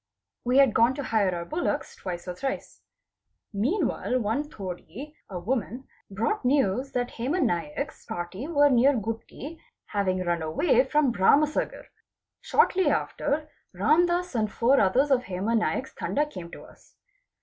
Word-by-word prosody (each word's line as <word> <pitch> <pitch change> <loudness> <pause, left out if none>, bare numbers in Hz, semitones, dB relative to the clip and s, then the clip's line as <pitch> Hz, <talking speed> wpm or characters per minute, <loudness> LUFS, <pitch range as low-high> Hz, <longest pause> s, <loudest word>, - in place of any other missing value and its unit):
We 250 +2 +2
had 270 -5 +6
gone 235 +3 +4
to 280 - -4
hire 205 -7 +1
our 170 0 -4
bullocks 330 - -2
twice 175 -1 -6
or 180 - -3
thrice. 265 +9 -5 0.7
Meanwhile 255 - 0
one 245 +7 -1
'T'oadi 195 - -8 0.2
(a 190 - -5
woman) 235 +5 -2 0.3
brought 225 - -1
news 255 -1 +1
that 245 -1 -1
Hema 275 +10 0
Naik's 170 - -2
party 175 - -5
were 290 -3 +4
near 260 +3 +5
Gutti, 225 +8 -6 0.2
having 185 -3 -1
run 175 -1 -1
away 350 - +2
from 295 -4 +2
Bharam 275 +9 +5
sagar. 300 - -3 0.5
Shortly 375 0 +2
after 305 +1 -1 0.2
Ramdas 345 - +2
and 215 -3 0
four 250 +6 +3
others 255 +9 +3
of 255 -2 +3
Hema 195 +5 -1
Naik's 240 +3 -1
Tanda 295 +2 -1
came 180 -12 -9
to - - -11
us. - - -19
245 Hz, 150 wpm, -26 LUFS, 190-290 Hz, 0.7 s, had